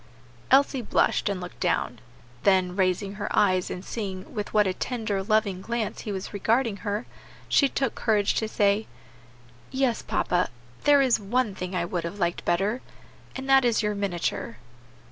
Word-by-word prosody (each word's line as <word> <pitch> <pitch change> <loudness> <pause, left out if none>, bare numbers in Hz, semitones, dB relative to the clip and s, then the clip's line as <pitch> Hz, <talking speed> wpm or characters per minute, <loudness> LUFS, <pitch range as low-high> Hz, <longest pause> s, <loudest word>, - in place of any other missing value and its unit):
Elsie 270 0 +4
blushed 215 - +1
and 200 -2 -2
looked 180 0 -9
down; 125 -2 0 0.4
then 185 -2 +3
raising 190 +1 0
her 205 0 -4
eyes, 185 -3 +3
and 180 - -6
seeing 190 -4 -5
with 210 -3 -4
what 210 -1 +4
a 190 - 0
tender, 220 -3 -2
loving 205 -2 +1
glance 230 +1 -3
he 210 - -5
was 190 +1 -5
regarding 225 +2 +1
her, 205 +2 -3 0.4
she 280 - +4
took 270 -3 -1
courage 210 -3 +1
to 220 - -1
say, 205 0 +1 0.8
"Yes 260 -3 0
papa, 180 0 0 0.4
there 285 -1 +6
is 255 -3 +3
one 220 +2 0
thing 185 0 -5
I 170 -1 0
would 175 -1 -3
have 170 +4 -5
liked 175 -3 -1
better, 200 +8 +1 0.5
and 265 0 -5
that 270 0 +6
is 235 -2 +2
your 210 0 +1
miniature." 200 +3 -2
205 Hz, 165 wpm, -26 LUFS, 190-235 Hz, 0.8 s, there